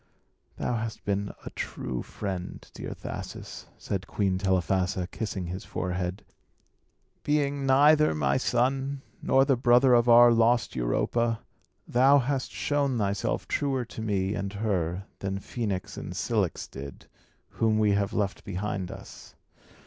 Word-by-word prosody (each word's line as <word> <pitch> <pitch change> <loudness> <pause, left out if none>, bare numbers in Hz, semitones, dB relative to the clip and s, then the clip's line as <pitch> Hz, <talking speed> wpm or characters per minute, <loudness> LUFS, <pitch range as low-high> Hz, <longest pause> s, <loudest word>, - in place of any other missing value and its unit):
"Thou 120 - -1
hast 110 0 -5
been 100 0 -1
a - - -6
true 65 -2 -4
friend, 95 -3 -6
dear - - -6
Thasus," - - -7
said 100 -1 -4
Queen 95 -3 0
Telephassa, 95 -1 +1
kissing 95 -4 -4
his 90 +2 -5
forehead. 90 +2 -3 1.0
"Being 140 -2 0
neither 145 - +5
my 75 - +1
son, 135 +2 0 0.2
nor 135 0 +4
the 135 - +3
brother 125 +1 +5
of 120 0 +4
our 120 0 +8
lost 115 +1 +3
Europa, 115 - 0 0.5
thou 135 +4 +5
hast 135 0 -1
shown 140 -3 0
thyself 100 -2 -1
truer 135 -3 0
to 110 0 -8
me 100 -3 0
and 100 -1 -3
her 95 -3 -1
than 95 0 -2
Phœnix 100 -2 -4
and - - -7
Cilix - - -1
did, 70 0 -9 0.4
whom 110 -1 +1
we 105 -1 +3
have 100 +1 +1
left 100 -3 -2
behind 100 -1 -3
us. - - -11
110 Hz, 135 wpm, -27 LUFS, 95-125 Hz, 1.0 s, our